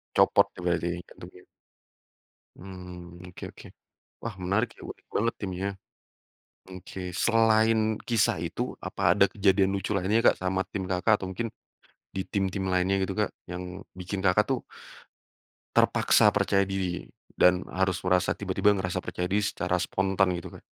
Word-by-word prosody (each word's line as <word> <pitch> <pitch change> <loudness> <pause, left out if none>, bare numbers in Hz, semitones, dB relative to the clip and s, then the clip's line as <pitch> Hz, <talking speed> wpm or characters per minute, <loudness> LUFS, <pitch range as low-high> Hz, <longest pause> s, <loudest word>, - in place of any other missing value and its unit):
Copot - - +5
ya - - -11
berarti, 85 -1 0
ini 90 - -5
jantungnya? 90 +1 -13 1.1
Mhm 90 -1 -10
oke - - -10
oke. - - -13 0.6
Wah 115 -4 -4
menarik 110 +6 +1
ya, - - -15
unik - - -10
banget 115 +3 +1
timnya. 95 -1 -3 1.0
Oke, 95 0 -9 0.2
selain 115 -1 +4 0.3
kisah 115 -4 +2
itu, - - -3
apa - - -6
ada - - +6
kejadian 95 -1 +3
lucu 95 0 -3
lainnya, 100 +4 +2
Kak, - - +5
sama 95 0 0
tim 95 -2 -4
kakak 95 +4 +3
atau 95 - -4
mungkin 115 +5 -3 0.7
di 95 - -1
tim-tim 95 -1 -1
lainnya 90 +1 +2
gitu, 95 0 -2
Kak? 105 -1 0 0.2
Yang 90 0 -7
bikin 95 +2 -5
Kakak 95 +3 +4
tuh 130 -3 +1 1.2
terpaksa - - +5
percaya 100 0 +3
diri 95 -2 -3 0.3
dan 90 0 +5
harus 95 -1 0
merasa 90 -1 +3
tiba-tiba 105 0 +2
merasa 95 -2 -2
percaya 90 0 -3
diri 105 +1 +1
secara - - -1
spontan 95 -1 +1
gitu, 85 - -7
Kak? - - -25
95 Hz, 150 wpm, -27 LUFS, 90-100 Hz, 1.2 s, ada